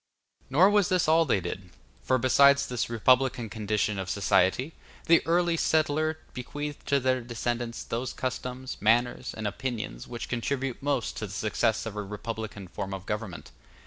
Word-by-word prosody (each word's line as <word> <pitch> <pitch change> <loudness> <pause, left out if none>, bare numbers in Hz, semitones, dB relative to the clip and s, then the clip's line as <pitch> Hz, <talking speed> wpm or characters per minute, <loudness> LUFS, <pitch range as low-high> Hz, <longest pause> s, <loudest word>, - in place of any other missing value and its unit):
Nor 175 +9 +5
was 205 -2 +3
this 185 -3 +2
all 165 +1 +5
they 100 - +2
did; 90 +1 -6 0.3
for 130 - +2
besides 140 +2 +5
this 125 -2 -2
republican 125 0 +2
condition 105 -2 -1
of 95 -1 -4
society, 100 - +2 0.3
the 170 0 +6
early 170 0 +3
settler 155 0 +1 0.2
bequeathed 145 +3 -6
to 140 -1 +3
their 130 -1 +1
descendants 120 0 -3
those 120 +3 -3
customs, 130 0 -4
manners, 120 +4 +2
and 110 - -4
opinions 110 - -4
which 120 -1 -6
contribute 130 +1 -2
most 140 -4 -1
to 110 - -3
the 100 - -9
success 110 +2 0
of 110 -2 -5
a 105 - -2
republican 105 -1 -6
form 95 +1 -5
of 95 0 -9
government. 105 -4 -5
120 Hz, 160 wpm, -28 LUFS, 105-140 Hz, 0.3 s, the